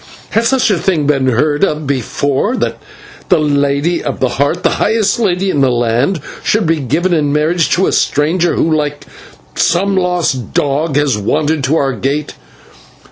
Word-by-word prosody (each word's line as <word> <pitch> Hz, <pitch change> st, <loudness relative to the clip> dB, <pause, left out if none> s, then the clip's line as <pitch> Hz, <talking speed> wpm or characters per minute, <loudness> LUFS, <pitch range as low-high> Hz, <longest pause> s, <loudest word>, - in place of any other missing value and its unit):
Has 230 Hz, +1 st, +1 dB
such 260 Hz, -4 st, +2 dB
a 185 Hz, -, +1 dB
thing 165 Hz, -6 st, 0 dB
been 140 Hz, -2 st, +1 dB
heard 145 Hz, +6 st, +1 dB
of 155 Hz, -5 st, 0 dB
before, 140 Hz, -, -1 dB
that -, -, -2 dB, 0.5 s
the 180 Hz, -, +5 dB
Lady 145 Hz, +2 st, 0 dB
of 140 Hz, -, -4 dB
the 130 Hz, -, +1 dB
Heart, 140 Hz, +8 st, -1 dB
the -, -, +1 dB
highest 220 Hz, +1 st, +1 dB
lady 190 Hz, -3 st, 0 dB
in 145 Hz, -, 0 dB
the 135 Hz, -, +3 dB
land, 120 Hz, +8 st, 0 dB, 0.2 s
should 215 Hz, -2 st, +1 dB
be 165 Hz, 0 st, +1 dB
given 160 Hz, +7 st, 0 dB
in 150 Hz, -3 st, +1 dB
marriage 155 Hz, +3 st, +1 dB
to 185 Hz, +2 st, +1 dB
a -, -, 0 dB
stranger 165 Hz, +4 st, +1 dB
who, 160 Hz, -1 st, +1 dB
like 145 Hz, -1 st, -3 dB, 0.5 s
some 195 Hz, -, +1 dB
lost 175 Hz, -, -1 dB
dog, 145 Hz, +1 st, 0 dB
has 145 Hz, -7 st, +1 dB
wandered 150 Hz, +7 st, 0 dB
to 145 Hz, +4 st, +1 dB
our 135 Hz, -3 st, 0 dB
gate?" 140 Hz, +6 st, -3 dB
150 Hz, 175 wpm, -14 LUFS, 140-175 Hz, 0.5 s, the